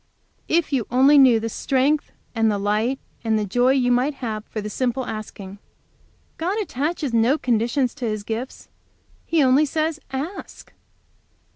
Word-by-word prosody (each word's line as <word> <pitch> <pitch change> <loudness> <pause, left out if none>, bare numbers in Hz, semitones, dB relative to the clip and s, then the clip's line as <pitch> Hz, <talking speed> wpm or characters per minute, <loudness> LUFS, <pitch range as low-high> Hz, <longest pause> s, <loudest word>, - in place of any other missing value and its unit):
"If 325 -2 +1
you 250 -6 0
only 270 +4 +5
knew 250 -4 +6
the 225 - -3
strength, 275 +5 0 0.2
and 225 -1 +2
the 205 - 0
light, 210 +6 0 0.3
and 220 -1 +1
the 210 - -1
joy 245 +6 +2
you 250 -2 +2
might 255 +4 +1
have 220 -5 -4
for 220 - -6
the 210 - -5
simple 255 +4 -2
asking. 205 -3 -7 0.8
God 365 +6 -1
attaches 300 - -2
no 230 +6 +3
conditions 240 +1 0
to 250 - -5
His 215 -2 -2
gifts. 230 +5 -6 0.6
He 330 -3 +3
only 270 +4 +4
says, 315 +1 -1
'Ask!'" 295 +9 -7
250 Hz, 155 wpm, -22 LUFS, 225-285 Hz, 0.8 s, knew